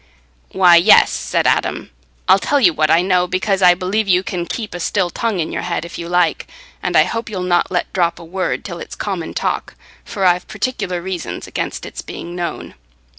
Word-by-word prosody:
"Why, 180 -2 +6
yes," 185 +6 +6
said - - -1
Adam; - - 0 0.4
"I'll 195 - +6
tell 285 +8 +1
you 180 -10 +5
what 155 0 +1
I 170 +3 +4
know, 180 -1 +2
because 190 +2 0
I 180 -1 +6
believe 195 +4 -1
you 185 -1 +3
can 175 -2 -4
keep 220 -4 -5
a 175 - -5
still 180 0 0
tongue 225 -2 -2
in 160 - -2
your - - -3
head 170 -1 -3
if 170 - -8
you 170 0 -6
like, 175 -2 +1 0.3
and - - 0
I - - +7
hope 230 0 -4
you'll 190 -4 -4
not 175 -1 +1
let 180 -1 -2
drop 175 -3 +1
a 170 - -11
word 185 +3 -3
till - - -6
it's - - -8
common - - -4
talk, - - -2 0.3
for 195 -3 -3
I've 180 0 +2
particular 200 -5 -3
reasons 185 -3 -5
against - - -4
its - - -7
being 175 +1 -8
known." 175 -1 -5
180 Hz, 210 wpm, -18 LUFS, 175-195 Hz, 0.4 s, I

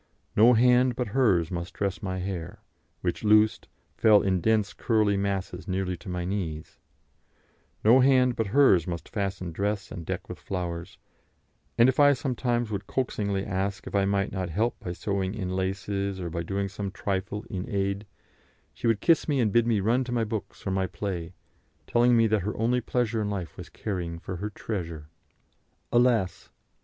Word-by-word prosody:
No 115 +4 +7
hand 125 +1 +4
but 125 -3 -2
hers 100 -9 +2
must 85 0 -5
dress 100 -2 -2
my 95 -2 -3
hair, 90 -3 -5 0.4
which, - - -2
loosed, 105 0 +4 0.3
fell 105 -2 +5
in 95 -2 +1
dense 110 -1 +2
curly 110 -3 +2
masses 100 -2 -2
nearly 95 -1 -1
to 85 - -10
my 90 -1 -3
knees; 85 -5 -4 1.0
no 115 +5 +7
hand 130 -2 +4
but 115 - -1
hers 100 - +4
must 85 -2 -4
fasten 95 -4 -3
dress 100 +4 -2
and 85 -6 -6
deck - - -4
with - - -8
flowers, 85 -2 -5 0.8
and 120 +1 +6
if 130 +1 +1
I 145 0 +7
sometimes 120 -4 -1
would 100 -1 -4
coaxingly 100 -6 -1
ask 95 0 -2
if - - -8
I 100 -1 +3
might 100 0 0
not 95 -2 -3
help 110 +8 -1
by 90 - -5
sewing 95 +1 -2
in 95 -4 -3
laces, 95 +1 -2
or 85 -2 -4
by 85 0 -2
doing 100 +3 -2
some 100 +1 -5
trifle 100 +2 -3
in 90 -2 -5
aid, 100 +1 -1 0.7
she - - -3
would 110 -3 +2
kiss 165 - +3
me 145 -3 +1
and 110 -5 +1
bid 120 0 +4
me 110 -4 +2
run 120 +6 +2
to 125 - -6
my 120 -2 +1
books 110 -1 -5
or 95 - -1
my 95 0 0
play, 90 -3 -5 0.5
telling 120 0 +4
me 115 - +5
that 110 -2 +2
her 105 +4 -3
only 120 +3 +1
pleasure 120 -1 0
in 105 - -1
life 95 -5 -4
was - - -9
caring 90 -5 -4
for 90 +2 -6
her 105 +4 -3
"treasure." 85 -8 -5 0.8
Alas! 120 -6 +2
100 Hz, 180 wpm, -27 LUFS, 95-115 Hz, 1.0 s, No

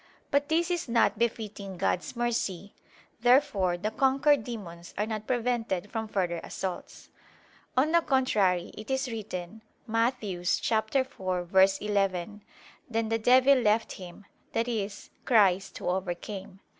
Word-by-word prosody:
But 285 +1 +2
this 335 +2 +1
is 345 -7 -2
not 230 -2 +2
befitting 210 -4 -3
God's 180 - -1
mercy. 215 -5 -2 0.5
Therefore 240 -8 +3
the 210 +5 -2
conquered 270 +2 +3
demons 175 -8 -8
are 210 - +1
not 215 -1 -5
prevented 230 -6 -1
from 225 -1 -3
further 180 -5 -1
assaults. 185 -2 -6 0.7
On 290 +5 +3
the 340 0 +5
contrary, 210 - +1
It 215 +3 -9
is 265 -1 -1
written 210 -2 -6 0.2
(Matt. 230 +2 +1
4:11): 195 -1 0 0.5
"Then 225 -1 -1
the 225 0 +1
devil 255 +4 +6
left 220 -1 +2
Him," 185 +1 -10 0.3
i.e. 230 -3 0 0.3
Christ 195 -5 +3
Who - - -6
overcame. 190 +1 -4
215 Hz, 120 wpm, -28 LUFS, 190-245 Hz, 0.7 s, devil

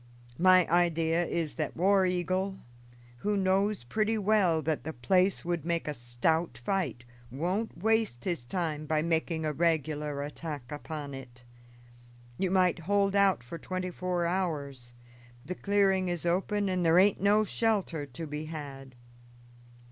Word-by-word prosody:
My 185 0 +6
idea 170 0 +2
is 165 -3 -2
that 155 -2 -3
War 190 +2 +4
Eagle, 185 +2 -1 0.6
who 205 +9 -1
knows 195 - +1
pretty 215 - 0
well 195 -6 +2
that 155 -2 -1
the 160 - -5
place 180 +10 +1
would 175 -2 -1
make 170 -1 -1
a 150 - -1
stout 120 +4 -1
fight, 125 -2 -2 0.2
won't 180 - -2
waste 220 - +1
his 170 -10 -2
time 155 -4 -3
by 155 0 +1
making 160 -1 0
a 155 - -1
regular 150 -2 0
attack 145 -3 -7
upon 150 -1 -6
it. 125 -2 -11 1.0
You 190 - +1
might 185 -2 +3
hold 200 +3 +1
out 195 -9 +3
for 150 +7 -8
twenty 185 +2 -4
four 180 -1 -2
hours; 145 -9 -3 0.5
the 180 - -3
clearing 195 -1 +2
is 175 -1 -3
open 195 +4 0
and 185 -1 0
there 165 0 +4
aint 195 +1 +4
no 205 +2 +4
shelter 195 -9 -1
to 140 +5 -7
be 150 +1 -5
had. 140 -4 -8
170 Hz, 150 wpm, -29 LUFS, 150-190 Hz, 1.0 s, My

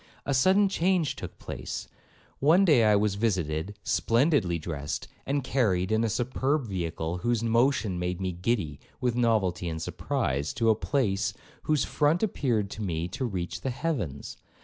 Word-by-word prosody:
A 140 - 0
sudden 190 +10 +4
change 180 -4 +1
took - - -8
place;—one 150 - -1
day 140 - +5
I 105 -1 +5
was 105 0 +2
visited, 95 -3 -1
splendidly 115 - +2
dressed, 75 -3 -4 0.2
and 140 0 0
carried 105 -8 +1
in 110 +1 +2
a 115 - +1
superb 130 +5 0
vehicle, 85 -3 -3
whose 120 +2 0
motion 115 -5 +2
made 90 0 -2
me 95 -1 -1
giddy 90 -5 -1 0.2
with 125 -2 0
novelty 105 -8 +1
and 80 -1 -4
surprise, 70 -2 -2
to 115 -1 +3
a - - +3
palace 105 -5 0 0.3
whose 155 -2 +2
front 150 +5 +1
appeared 120 - 0
to 110 - -6
me 85 -4 -2
to 130 +8 -3
reach 90 -6 -4
the 135 - -2
heavens. 120 - -3
110 Hz, 155 wpm, -28 LUFS, 90-135 Hz, 0.3 s, day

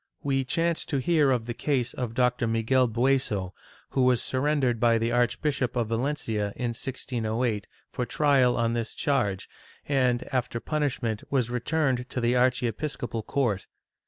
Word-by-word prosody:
We 135 -1 +1
chance 165 +5 +1
to 140 - -1
hear 150 +1 +3
of 125 -4 +1
the 120 - -3
case 130 -2 -1
of 120 -3 -4
Dr. 125 -1 +2
Miguel 115 +3 +2
Bueso, 115 -6 0 0.4
who 130 - +1
was 125 -2 +4
sui'rendered 130 -3 0
by 115 0 +4
the 115 +1 0
Archbishop 125 +2 0
of 120 -3 0
Valencia, 115 -4 -1
in 120 -2 -2
1608, 115 -3 -2 0.2
for 125 - -3
trial 135 -5 +3
on 115 -1 +1
this 115 -1 -3
charge 105 -9 0 0.4
and, 130 -3 +2
after 125 -2 -1
punishment, 130 -7 -1
was 125 -4 0
returned 130 0 0
to - - -3
the 120 +1 +2
archiepiscopal 125 -1 0
court. 110 -4 -1
125 Hz, 150 wpm, -27 LUFS, 115-135 Hz, 0.4 s, was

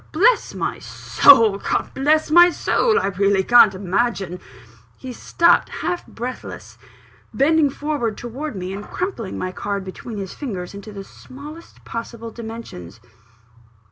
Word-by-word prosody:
Bless 445 +10 +2
my - - -3
soul 225 -7 +4
God - - -2
bless 305 +3 +1
my 345 +2 +8
soul, 445 +5 +1
I - - -2
really 195 0 +1
can't 235 -3 +6
imagine 190 -1 -2 0.3
" 115 0 -27
He 255 -1 -8
stopped, 340 +8 +2
half 355 - -4
breathless, 245 +2 -8 0.6
bending 305 +1 +3
forward 275 -7 -3
towards 260 +4 -6
me, 185 +1 -5
and 200 +1 -6
crumpling 245 - -5
my 185 - -3
card 200 +1 -4
between 205 +4 -8
his 195 -2 -6
fingers 195 -11 -6
into 200 +2 -9
the 200 -1 -8
smallest 295 +10 -13
possible 230 0 -7
dimensions. 220 - -9
230 Hz, 140 wpm, -21 LUFS, 195-290 Hz, 0.6 s, my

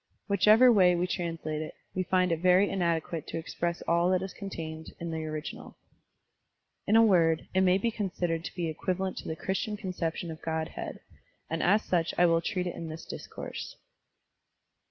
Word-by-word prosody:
Whichever 215 +5 +6
way 185 -5 +5
we 175 +1 +1
translate 165 -4 -3
it, 155 - -6 0.2
we 185 - -1
find 185 -1 +2
it 165 - 0
very 185 +3 +5
inadequate 170 -3 -1
to - - -4
express 170 +1 -3
all 170 +1 +2
that 185 0 +2
is 190 - -6
contained 160 -5 -7
in 170 0 -4
the 160 -1 -3
original. 155 0 -6 1.1
In 215 - +4
a 225 - +8
word, 165 -6 +3
it 190 - +3
may 185 0 +4
be 230 +4 0
considered 175 -6 -2
to - - -7
be 175 -2 -1
equivalent 185 +4 -2
to - - -6
the 160 - -2
Christian 195 +5 -2
conception 175 -4 -3
of 160 - -9
Godhead, 160 -1 -4 0.5
and 165 - -1
as 205 +4 +4
such 170 -2 0
I 175 - +6
will 165 -1 +3
treat 180 +2 -2
it 175 - -3
in 165 - -6
this 160 +1 -7
discourse. - - -7
175 Hz, 180 wpm, -29 LUFS, 165-190 Hz, 1.1 s, a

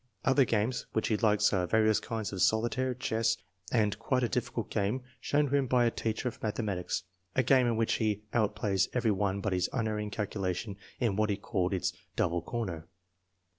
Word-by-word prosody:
Other 135 0 +5
games 115 +2 0
which 110 - 0
he 110 - +2
likes 105 -2 +3
are 90 -2 +1
various 110 +2 +3
kinds 110 -3 -4
of 95 - -3
solitaire, 120 +6 +2
chess, 110 -2 0 0.3
and 105 -3 +2
quite 125 +2 +1
a - - +3
difficult 120 -1 -2
game 110 +5 0 0.2
shown 145 +1 +1
to - - +3
him 140 -2 +2
by 125 -1 +3
a 115 - +3
teacher 110 +3 -2
of 120 - -5
mathe 105 -2 -1
matics, 95 -7 -2 0.3
a 130 - +3
game 130 0 +4
in 115 -2 +1
which 115 0 +2
he 105 -1 0
outplays 100 -3 +1
every 120 -3 +2
one 100 0 0
by 100 - -1
his 90 0 +1
unerring 110 -4 -1
calculation 100 -1 -3 0.2
in 115 -6 +1
what 110 0 +2
he 100 - 0
called 95 -3 -1
its 95 -2 0 0.2
'double 85 +1 +1
corner.' 85 -5 -4
110 Hz, 195 wpm, -30 LUFS, 100-120 Hz, 0.3 s, Other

